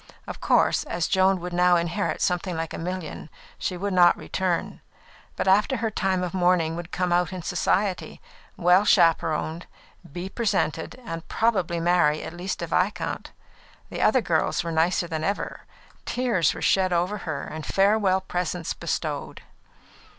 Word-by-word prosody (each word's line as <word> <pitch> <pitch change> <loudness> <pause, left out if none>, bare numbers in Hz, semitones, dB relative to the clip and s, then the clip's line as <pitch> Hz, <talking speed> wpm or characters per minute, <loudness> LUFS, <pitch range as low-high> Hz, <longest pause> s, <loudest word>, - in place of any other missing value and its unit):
Of - - -8
course, - - +3
as 170 -1 -2
Joan 190 0 +3
would 180 0 -5
now 180 0 +4
inherit 170 +4 -1
something 180 0 -1
like 165 0 -4
a - - -5
million, 175 -3 -5 0.3
she 180 - -2
would 200 +2 -2
not 175 -1 +5
return, 185 -2 -2 0.5
but - - -2
after 210 +7 +3
her 225 -1 -2
time 190 -3 0
of 180 - -4
mourning 175 -3 +2
would 175 0 -7
come 180 -1 0
out 175 -1 +2
in 185 -2 -6
Society, 185 +2 -1 0.4
well 180 +2 +4
chaperoned, 165 -3 +2 0.4
be 175 +5 -5
presented, 190 -7 -1
and 165 -5 -6
probably 190 -7 0
marry 165 -3 +2
at - - -7
least 175 0 -4
a - - 0
viscount. 180 +4 -1 0.6
The - - -4
other 260 - +4
girls 170 -5 0
were 170 - -3
nicer 165 +2 +1
than 160 -2 -3
ever; 200 +5 -3 0.4
tears 235 -9 +1
were - - -6
shed 190 -1 +3
over 180 +4 0
her, 160 -6 -4
and 155 0 -7
farewell 195 0 +2
presents 180 -2 -3
bestowed. - - -4
180 Hz, 160 wpm, -25 LUFS, 170-190 Hz, 0.6 s, not